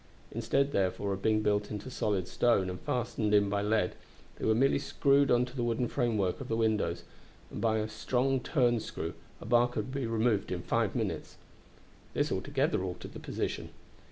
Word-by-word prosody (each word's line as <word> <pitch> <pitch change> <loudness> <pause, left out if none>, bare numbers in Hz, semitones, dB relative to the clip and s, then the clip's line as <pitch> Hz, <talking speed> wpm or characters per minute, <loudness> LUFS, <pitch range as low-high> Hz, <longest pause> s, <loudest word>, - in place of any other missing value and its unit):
Instead, 140 0 +1
therefore, 100 0 0
of 95 - -5
being 110 0 +2
built 105 0 +1
into 105 +5 -6
solid 100 -6 -1
stone 95 -6 +2
and 90 - -6
fastened 115 -3 0
in 100 -1 +4
by 100 0 0
lead, 105 -2 +1 0.4
they - - -4
were 110 - +4
merely 135 +4 +3
screwed 140 0 +3
on 120 0 +4
to 125 +1 -12
the 120 - -1
wooden 120 +1 0
framework 110 -9 0
of - - -6
the 115 - 0
windows, 105 -7 +1 0.5
and - - -5
by 110 -1 +2
a 110 0 -1
strong 125 +5 0
turn 120 -4 +2
screw - - -5 0.3
a - - -10
bar 120 +2 +4
could 120 0 -4
be 135 -3 -2
removed 110 -2 +1
in 90 -1 -3
five - - 0
minutes. - - -3 0.8
This - - +1
altogether - - 0
altered 90 -1 -6
the - - -7
position. - - -3
110 Hz, 185 wpm, -31 LUFS, 100-125 Hz, 0.8 s, in